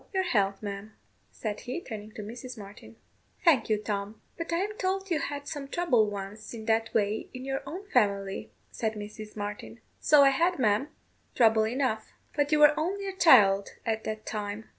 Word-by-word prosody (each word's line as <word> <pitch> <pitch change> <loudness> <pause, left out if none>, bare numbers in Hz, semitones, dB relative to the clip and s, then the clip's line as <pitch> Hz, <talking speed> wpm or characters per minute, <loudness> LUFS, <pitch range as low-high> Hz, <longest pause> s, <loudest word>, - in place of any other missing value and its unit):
Your 380 - +3
health, 200 - +1
ma'am," 200 +1 -6 0.4
said 210 -2 -5
he, 255 +7 -4
turning 215 -8 -8
to 215 - -7
Mrs. 245 +3 -8
Martin. 205 +2 -11 0.5
"Thank 275 -11 +5
you, 215 - +3
Tom. 205 0 -4 0.2
But 335 0 -5
I 335 - +2
am 405 +4 -1
told 385 0 -1
you 320 - +2
had 285 0 -4
some 290 -3 -5
trouble 265 -9 +2
once 205 +2 -7
in 220 -1 -8
that 225 0 +1
way 210 0 0
in 255 +1 -6
your 270 0 -2
own 370 +8 -7
family," 200 -4 +1 0.2
said 220 -1 -2
Mrs 210 +1 -8
Martin. 205 +2 -6 0.2
"So 295 -2 +6
I 275 - +7
had, 340 +6 +2
ma'am; 220 +1 +2 0.5
trouble 225 -2 +4
enough: 240 -2 -1 0.2
but 290 0 +1
you 305 - +5
were 300 0 +7
only 395 +5 -2
a 385 - -4
child 205 - +6
at 220 -1 -1
that 215 0 -4
time." 210 0 -4
225 Hz, 185 wpm, -28 LUFS, 210-290 Hz, 0.5 s, I